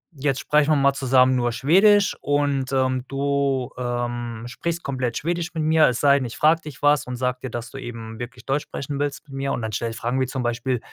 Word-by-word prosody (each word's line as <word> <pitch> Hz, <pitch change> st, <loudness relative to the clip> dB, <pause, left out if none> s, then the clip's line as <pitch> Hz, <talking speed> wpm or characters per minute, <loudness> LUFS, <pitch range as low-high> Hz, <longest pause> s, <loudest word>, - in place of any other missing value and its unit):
jetzt 135 Hz, -1 st, -1 dB
sprechen 150 Hz, 0 st, +2 dB
wir -, -, +5 dB
mal 140 Hz, 0 st, +3 dB
zusammen 130 Hz, -1 st, +3 dB
nur 120 Hz, -1 st, +1 dB
Schwedisch 195 Hz, -, +4 dB
und, 145 Hz, -2 st, 0 dB
ähm, 130 Hz, -1 st, +1 dB
du, 140 Hz, -2 st, 0 dB
ähm, 120 Hz, -2 st, -3 dB
sprichst 170 Hz, +7 st, -4 dB
komplett 130 Hz, -3 st, -2 dB
Schwedisch 170 Hz, +4 st, -2 dB
mit 155 Hz, -, -1 dB
mir, 160 Hz, 0 st, +5 dB
es 120 Hz, -, -2 dB
sei 140 Hz, -1 st, +5 dB
denn, 130 Hz, -, -2 dB
ich 120 Hz, -, -7 dB
frage 160 Hz, +2 st, +4 dB
dich 150 Hz, -4 st, -10 dB
was 145 Hz, 0 st, +4 dB
und 125 Hz, -, -4 dB
sage 125 Hz, 0 st, -1 dB
dir, 130 Hz, -, -4 dB
dass 120 Hz, +1 st, -6 dB
du 135 Hz, -, -8 dB
eben 115 Hz, -3 st, -8 dB
wirklich 120 Hz, 0 st, -8 dB
Deutsch 140 Hz, +2 st, 0 dB
sprechen 140 Hz, 0 st, -5 dB
willst 145 Hz, +1 st, -3 dB
mit 135 Hz, -, -10 dB
mir“ 135 Hz, 0 st, -2 dB
und -, -, -2 dB
dann 110 Hz, 0 st, -3 dB
stelle 115 Hz, +2 st, -2 dB
ich 115 Hz, -, -8 dB
Fragen 125 Hz, +4 st, -1 dB
wie 130 Hz, -, +1 dB
zum 130 Hz, 0 st, -3 dB
Beispiel, 120 Hz, +1 st, -1 dB
135 Hz, 235 wpm, -23 LUFS, 120-145 Hz, -, wir